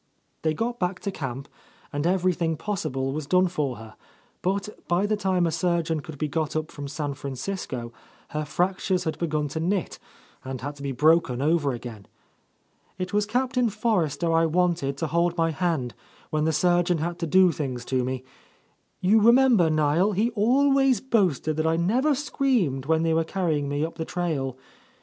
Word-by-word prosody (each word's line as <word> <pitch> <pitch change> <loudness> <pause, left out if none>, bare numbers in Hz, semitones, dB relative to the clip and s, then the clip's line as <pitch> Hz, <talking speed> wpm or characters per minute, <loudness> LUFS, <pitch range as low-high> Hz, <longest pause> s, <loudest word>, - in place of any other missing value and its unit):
They 155 -1 0
got 235 +6 -2
back 180 0 -1
to 200 - -3
camp, 135 -4 -5 0.5
and 145 +3 0
everything 175 -3 +1
possible 140 -10 -2
was 150 -1 -4
done 185 +3 +4
for 150 -7 -2
her, 110 -1 -12 0.5
but 195 +2 -1 0.2
by 175 +3 +2
the 215 +1 +1
time 190 -3 +1
a 165 - 0
surgeon 170 -2 0
could 155 0 -9
be 150 - -1
got 155 +1 -2
up 155 +1 -2
from 145 -2 -7
San 145 0 -3
Francisco, 130 -3 -5 0.4
her 155 0 -2
fractures 185 +4 0
had 160 - -3
begun 155 -3 -1
to 160 - -4
knit 180 +2 -1 0.4
and 130 -1 -5
had 145 +2 -5
to - - -11
be 140 -1 -3
broken 150 -2 +3
over 150 0 +2
again. 115 -5 -8 0.9
"It 185 0 -4
was 205 0 +1
Captain 250 +1 +1
Forrester 180 -7 0
I 165 0 +4
wanted 165 -5 0
to 165 - -2
hold 170 +2 +1
my 165 0 +2
hand 160 -8 -1 0.4
when 155 0 +1
the 160 - +2
surgeon 175 +2 +2
had 170 +2 -3
to 170 - -2
do 185 +2 +5
things 130 -5 -4
to 130 0 0
me. 130 0 -3 0.8
You 210 +4 +4
remember, 235 -6 +5
Niel, 155 +6 +2
he 220 +5 +1
always 270 +4 +3
boasted 185 - +1
that 160 0 +1
I 160 - +2
never 245 - +2
screamed 240 - 0
when 160 0 +2
they 165 -1 +2
were 165 0 +2
carrying 160 -5 -1
me 145 +2 0
up 165 0 -8
the 160 - -2
trail. 150 -8 -2
165 Hz, 180 wpm, -25 LUFS, 145-190 Hz, 0.9 s, do